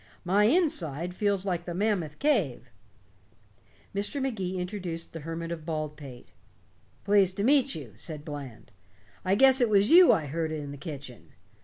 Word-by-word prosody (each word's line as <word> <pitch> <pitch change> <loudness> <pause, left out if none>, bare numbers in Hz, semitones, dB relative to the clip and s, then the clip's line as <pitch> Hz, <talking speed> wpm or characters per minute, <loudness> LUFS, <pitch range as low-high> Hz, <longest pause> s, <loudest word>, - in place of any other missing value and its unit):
My 200 +4 +3
inside 180 - 0
feels 200 0 0
like 175 -3 -2
the 175 - -5
Mammoth 185 -6 -1
Cave." 150 - 0 1.2
Mr. 205 +8 -3
Magee 195 -9 -2
introduced 180 -3 -5
the 165 - -6
Hermit 165 +2 -5
of 165 -2 -5
Baldpate. 150 -5 -6 0.7
"Pleased 195 -2 +3
to 200 - -1
meet 275 +2 +3
you," 140 -8 -8
said 150 - -8
Bland. 135 -7 -8 0.5
"I 190 +1 +2
guess 265 +3 +5
it 240 - +3
was 205 +2 +3
you 355 +1 +9
I 155 - +1
heard 160 +2 -3
in 145 -2 -5
the 145 - -8
kitchen. 140 - -9
175 Hz, 155 wpm, -28 LUFS, 150-205 Hz, 1.2 s, you